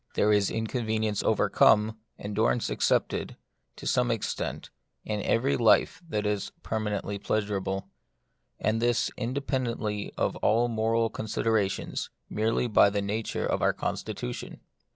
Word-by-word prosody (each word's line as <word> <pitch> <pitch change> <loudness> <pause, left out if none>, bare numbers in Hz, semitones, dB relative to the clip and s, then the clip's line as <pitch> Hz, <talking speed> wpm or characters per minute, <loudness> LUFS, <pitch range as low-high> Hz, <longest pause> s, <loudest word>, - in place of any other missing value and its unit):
There 105 0 +4
is 100 -1 +3
inconvenience 110 -2 -1
overcome, 110 +1 +4 0.2
endurance 110 +3 0
accepted, - - 0 0.4
to - - -10
some 125 -1 +2
extent, 115 -3 -3 0.3
in 105 -1 -2
every 130 +7 +2
life 120 +7 +3
that 105 -5 -1
is 105 -1 -1
permanently 105 -2 -2
pleasurable; 100 -2 -1 0.7
and 110 +2 0
this, 120 0 +2
independ 130 -1 -1
ently 105 -2 -3
of - - 0
all 115 +3 +3
moral 115 0 +1
considerations, 110 -2 -1 0.2
merely 110 +3 +1
by 105 -3 +5
the 100 0 -1
nature 105 +2 -2
of - - 0
our - - +3
constitution. - - -4
110 Hz, 125 wpm, -28 LUFS, 105-115 Hz, 0.7 s, by